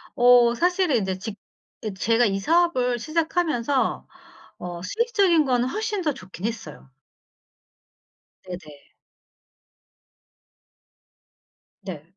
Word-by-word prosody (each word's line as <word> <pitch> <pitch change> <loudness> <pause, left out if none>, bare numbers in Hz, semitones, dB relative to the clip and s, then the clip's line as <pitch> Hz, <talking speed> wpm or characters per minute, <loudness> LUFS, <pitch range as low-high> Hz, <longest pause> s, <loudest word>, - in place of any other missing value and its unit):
어 245 -1 +6
사실은 355 -2 +2
인제 190 -3 -2
직 210 +1 -6 0.5
예 215 - -3
제가 230 +5 +2
이 195 -2 0
사업을 255 - +2
시작하면서 310 -3 0 0.5
어 175 -1 -7
수익적인 400 - +2
거는 250 -2 +1
훨씬 425 - -2
더 305 -4 0
좋긴 185 -5 -9
했어요. 200 -12 -6 1.5
네네. 165 -6 -11 2.9
네. 175 -6 -7
245 Hz, 180 characters per minute, -24 LUFS, -, 2.9 s, 어